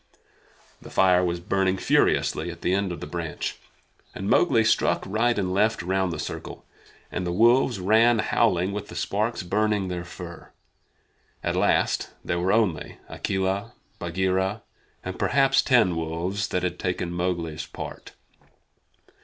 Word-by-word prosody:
The - - -11
fire 90 -1 +4
was 85 -1 -1
burning 95 +1 0
furiously - - +2
at - - -9
the 90 - +1
end 100 -1 0
of 85 - -6
the - - -4
branch, 85 -3 -4 0.6
and 95 - -4
Mowgli 120 -2 +4
struck 110 - +2
right 115 +4 +1
and 90 -2 -1
left 105 0 +1
round 95 0 0
the - - -4
circle, - - -6 0.5
and 90 - -3
the 90 - -2
wolves 120 +3 +4
ran 110 +5 +4
howling 100 -4 +2
with 105 0 -5
the - - -10
sparks 110 +1 -1
burning 105 +1 0
their 90 -1 -3
fur. 85 -1 -10 0.9
At - - -1
last - - +1 0.2
there 85 - -1
were 90 +2 +1
only 105 -9 0
Akela, 100 +4 -2 0.3
Bagheera, 95 +4 -1 0.4
and 95 0 -5
perhaps 135 0 +3
ten 120 -9 +3
wolves 85 +5 -2
that 90 - -2
had 90 -1 -2
taken 90 -1 -2
Mowgli's 85 -3 -2
part. - - -8
95 Hz, 145 wpm, -25 LUFS, 90-110 Hz, 0.9 s, fire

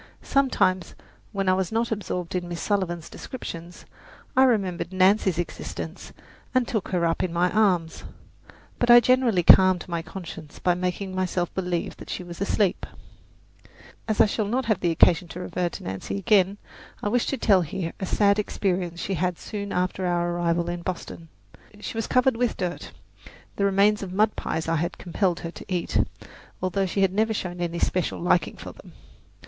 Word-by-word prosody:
Sometimes, 190 -10 +1 0.4
when 195 -2 -2
I 185 - +5
was 190 0 -1
not 230 +1 0
absorbed 180 -5 -3
in 180 -1 -2
Miss 170 -1 -4
Sullivan's 175 -5 -1
descriptions, 175 -8 -8 0.5
I 265 - +6
remembered 190 -8 0
Nancy's 190 -1 +3
existence 175 - -5 0.4
and 255 -2 +3
took 220 -5 -2
her 175 -2 0
up 165 0 0
in 180 - -1
my 175 +2 +1
arms, 180 -7 +1 0.8
but 240 - +1
I 240 0 +10
generally 240 -6 +3
calmed 185 0 +6
my 170 -2 -2
conscience 165 -4 -9
by 180 - +2
making 180 +2 -3
myself 185 -2 -1
believe 180 -2 -2
that - - -11
she - - -4
was 175 +1 -9
asleep. 200 -1 +1 1.2
As 215 -2 -1
I - - +8
shall 210 0 -1
not 255 +5 0
have 215 -5 0
occasion 170 0 +4
to 170 - -8
refer 180 -1 -2
to - - -9
Nancy 95 - -4
again, 200 0 +3 0.5
I - - 0
wish 240 +3 +1
to 275 - -1
tell 200 -5 +4
here 165 +1 -4
a 190 - -3
sad 200 +1 +3
experience 180 -4 -1
she 195 - -2
had 180 0 -1
soon 200 -2 -6
after 180 +1 -1
our 175 0 0
arrival 170 0 0
in 175 0 -3
Boston. 170 -2 -6 0.5
She 210 - -6
was 225 -1 -2
covered 255 -1 +3
with 245 -1 0
dirt 180 -2 -4 0.6
the 200 - +1
remains 200 +2 +3
of 195 -2 -5
mud 210 +3 +2
pies 160 - -3
I 165 0 +1
had 170 +3 -2
compelled 180 0 -1
her 165 - -5
to - - -11
eat, 180 -2 0 0.6
although 190 +1 0
she 195 +2 -1
had 190 -1 +3
never 220 +2 +1
shown 180 -3 -4
any 170 0 -2
special 180 +1 0
liking 175 0 +1
for - - -8
them. - - -15
185 Hz, 180 wpm, -25 LUFS, 175-205 Hz, 1.2 s, I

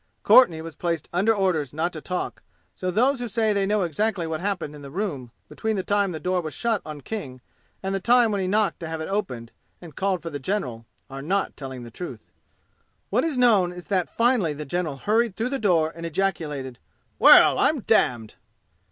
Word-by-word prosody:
Courtenay 170 -11 +6
was 165 0 -8
placed 170 0 -3
under 195 +6 +3
orders 185 - 0
not 165 +4 -1
to 155 - -6
talk, 180 +2 -4 0.3
so 185 - -4
those 250 +8 +2
who 245 - -3
say 220 0 +1
they 200 -1 +1
know 210 -1 +1
exactly 180 +2 -1
what 160 -1 -3
happened 180 -5 -3
in 150 - -11
the 140 - -9
room 150 - -4 0.2
between 220 -1 -3
the 190 - -2
time 205 +1 +2
when - - -5
the 160 - -5
door 180 +3 0
was 155 -2 -6
shut 230 -4 0
on 150 -2 -8
King 140 -10 -6 0.4
and 195 0 -2
the 195 - 0
time 235 +2 +4
when 200 -2 -1
he 185 - -1
knocked 210 +2 +1
to 165 - -6
have 160 0 -4
it 160 - -4
opened 155 - -3 0.3
and 165 -5 -12
called 190 -3 -1
for 165 - -5
the 145 - -5
general, 125 - -3 0.2
are 135 0 -8
not 190 +7 -1
telling 130 -3 -7
the 120 - -10
truth. 175 +9 -8 0.8
What - - +2
is 320 -5 -1
known 215 -8 +4
is 180 0 -10
that 185 -2 +1
finally 230 -9 +2
the 150 +1 -7
general 160 -1 -2
hurried 220 - +1
through 230 +3 -2
the 270 0 -2
door 165 -6 +2
and 170 - -9
ejaculated, 155 -7 -2 0.4
"Well, - - +8
I'm - - +2
damned!" 115 -3 +1
180 Hz, 215 wpm, -24 LUFS, 155-205 Hz, 0.8 s, Well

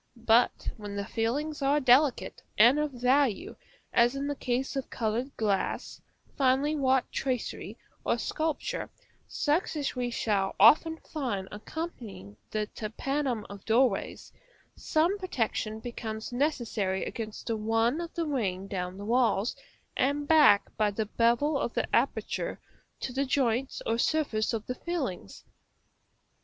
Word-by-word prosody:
But 235 0 +2
when 205 -2 -7
the 200 0 -3
fillings 285 +9 -2
are 280 +2 +3
delicate 260 +1 +3 0.2
and 240 +7 +7
of 300 0 0
value, 250 -2 +1 0.4
as 240 +3 +4
in 275 +1 -2
the 290 0 -2
case 260 +1 -2
of 270 - -3
colored 235 +4 -2
glass, 205 -3 -1 0.3
finely 275 +3 +2
wrought 265 -3 +2
tracery, 255 -4 -3 0.3
or - - +1
sculpture, 320 +10 -2 0.4
such 315 +3 0
as 285 -2 -2
we 250 -1 -1
shall 200 -5 0
often 310 - +6
find 240 -14 -4
occupying 215 - -7
the 215 -1 -1
tympanum 240 +2 -3
of 200 -1 -10
doorways, 245 +3 +1 0.4
some 340 +6 +1
protection 225 - -2
becomes 220 -1 -6
necessary 230 -9 -1
against 220 -2 -6
the 230 - -1
run 225 +7 +1
of 340 0 -6
the 335 -1 -1
rain 200 -11 -1
down 180 -1 -4
the 200 - -7
walls, 235 -2 +2 0.4
and 285 +2 0
back 295 -11 +5
by 215 -1 +3
the 215 +2 -2
bevel 240 +7 +2
of - - -3
the - - +1
aperture - - -1 0.4
to 255 - -4
the 270 +2 +1
joints 265 -1 0
or 230 +1 0
surface 240 -8 +1
of 225 -2 -3
the 250 - -3
fillings. 255 - -5
245 Hz, 140 wpm, -29 LUFS, 215-285 Hz, 0.4 s, and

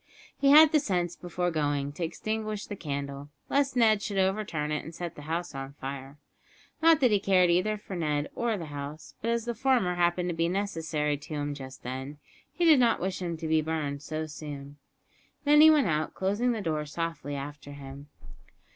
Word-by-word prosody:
He 275 - +2
had 305 +2 +9
the 305 - +5
sense, 175 - -1
before 175 0 -2
going, 145 -3 -1
to 160 +4 -5
extinguish 215 +5 -3
the 205 - -6
candle, 140 -3 -5 0.2
lest 275 -2 +1
Ned 220 -4 +4
should 200 -1 -3
overturn 190 -6 0
it 150 - -1
and 160 +2 -9
set 175 -2 -5
the - - -11
house 170 +1 -2
on 135 0 -6
fire; 135 0 -7 0.6
not 325 -2 +6
that 250 -3 +5
he 205 - +4
cared 185 -3 +4
either 210 +5 +2
for 200 -2 -8
Ned 150 -3 -1
or 235 -2 -1
the 170 - -5
house, 145 +2 -7
but 230 - -1
as 235 -1 0
the 240 - -2
former 235 -6 +2
happened 175 0 +1
to 170 - -2
be 165 +1 +1
necessary 160 -6 -1
to 150 +2 -8
him 145 0 -2
just 130 -2 -10
then, 130 +4 -5 0.3
he 350 - 0
did 310 -5 +7
not 235 -2 +3
wish 185 +1 -3
him 170 -2 -3
to 160 0 -5
be 160 0 +3
burned 150 -3 -3
too 155 +2 -4
soon. 145 -2 -8 0.7
Then 295 +1 +6
he 315 - +10
went 300 -3 +5
out, 155 -3 -1
closing 205 +6 +1
the 225 -3 -2
door 155 -4 -2
softly 150 -2 -4
after 145 +1 -7
him. 140 0 -10
170 Hz, 200 wpm, -28 LUFS, 145-210 Hz, 0.7 s, he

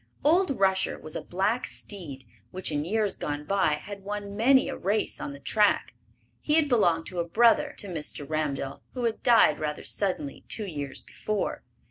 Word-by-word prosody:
Old 315 - +3
Rusher 190 -1 +2
was 155 - -9
a - - -2
black 200 +7 0
steed 150 - -6 0.2
which, 185 -3 -2
in 145 -1 0
years 210 +4 -1
gone 145 0 -3
by, 190 -5 +2
had 195 +6 -6
won 205 0 -5
many 260 +5 +5
a - - -3
race 205 +3 -1
on - - -4
the 140 - -9
track. 210 +6 +2 0.5
He 300 - +1
had 320 -2 +4
belonged 175 -11 +3
to 180 - -5
a - - +2
brother 235 - +4
to 205 - -2
Mr. 150 -4 -4
Ramdell, 145 -3 -2
who 250 - -3
had 230 -2 -1
died 230 - +5
rather 150 -1 -3
suddenly 180 -8 -2
two 215 - -3
years 145 -7 -6
before. 215 -1 -3
195 Hz, 180 wpm, -27 LUFS, 155-220 Hz, 0.5 s, many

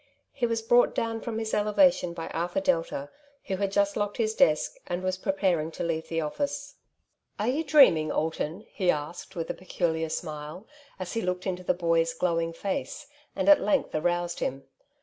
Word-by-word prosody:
He 245 -3 0
was 230 -1 -1
brought 240 +2 +4
down 225 0 -1
from 225 -2 -4
his 220 -1 -3
eleva 210 +7 +5
tion 175 -9 -5
by 165 - -5
Arthur 175 - -1
Delta, 165 - -1 0.3
who 190 - -2
had 200 0 -1
just 200 0 +2
locked 205 -1 -2
his 220 -2 +1
desk, 155 -7 +2
and 175 +1 -3
was 185 0 0
preparing 185 -4 0
to - - -4
leave 160 -1 -2
the 165 0 -1
office. 285 - -3 0.3
" - - -39
Ai'e 245 +7 +1
you 320 - 0
dreaming, 210 - +5
Alton? 160 +4 -2
'' - - -30
he 185 -3 0
asked 170 +5 -2
with 165 -2 -3
a - - -4
peculiar 165 -3 -2
smile, 155 +3 -6 0.3
as 185 -2 -5
he 225 - -1
looked 180 -1 -2
into 185 -2 -3
the 180 - +1
boy's 165 -1 +1
glowing 165 -1 0
face, 195 - -4 0.3
and - - -1
at 300 -1 +8
length 285 - +1
aroused 175 +2 0
him. 135 +1 -3
180 Hz, 195 wpm, -27 LUFS, 165-225 Hz, 0.3 s, at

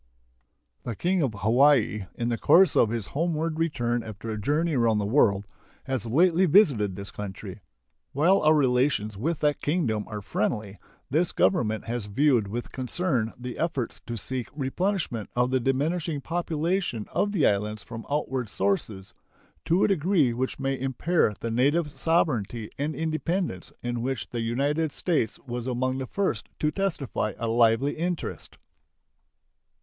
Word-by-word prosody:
The 115 - -5
King 180 - +1
of 130 -8 0
Hawaii, 120 -3 +3
in 120 0 -2
the 120 - 0
course 170 +2 +5
of 110 - +4
his 115 -3 -2
homeward 160 0 -1
return 120 -7 0
after 110 0 -7
a 110 -1 -4
journey 155 +8 +1
around 115 -3 +3
the 105 - 0
world, 100 -4 +3 0.4
has 130 -4 -3
lately 175 +8 +4
visited 140 - +4
this 100 +1 -7
country. 100 0 -7 0.5
While 170 +8 +3
our 155 +1 +5
relations 125 -6 +2
with 150 +10 -2
that 150 -1 +1
Kingdom 135 -10 0
are 105 -2 -6
friendly, 105 0 -2 0.3
this 165 +5 +2
Government 110 - +1
has 115 -3 -4
viewed 120 0 +2
with 120 +4 -5
concern 130 -3 -1
the 125 0 -7
efforts 160 -8 -2
to 120 -1 -4
seek 125 +2 -3
replenishment 150 - -2
of 125 +1 +2
the 130 - +2
diminishing 150 +5 0
population 165 - -1
of 205 - +1
the 190 -7 +2
islands 105 +1 0
from 115 0 -8
outward 135 -5 -1
sources, 100 -1 -2 0.5
to 175 +4 +3
a - - +5
degree 175 - +2
which 130 +2 -2
may 135 0 -1
impair 135 +2 +1
the 115 - -2
native 145 +6 +1
sovereignty 120 - 0
and 150 +1 -1
independence, 160 - -2
in 120 -1 -2
which 120 -8 -3
the 120 - -2
United 140 +7 0
States 155 -10 0
was 120 -1 -4
among 130 +1 -1
the 130 - -4
first 190 - -2
to 150 - 0
testify 150 - -2
a 115 - -3
lively 115 +4 +3
interest. 175 +1 -4
130 Hz, 155 wpm, -26 LUFS, 115-160 Hz, 0.5 s, course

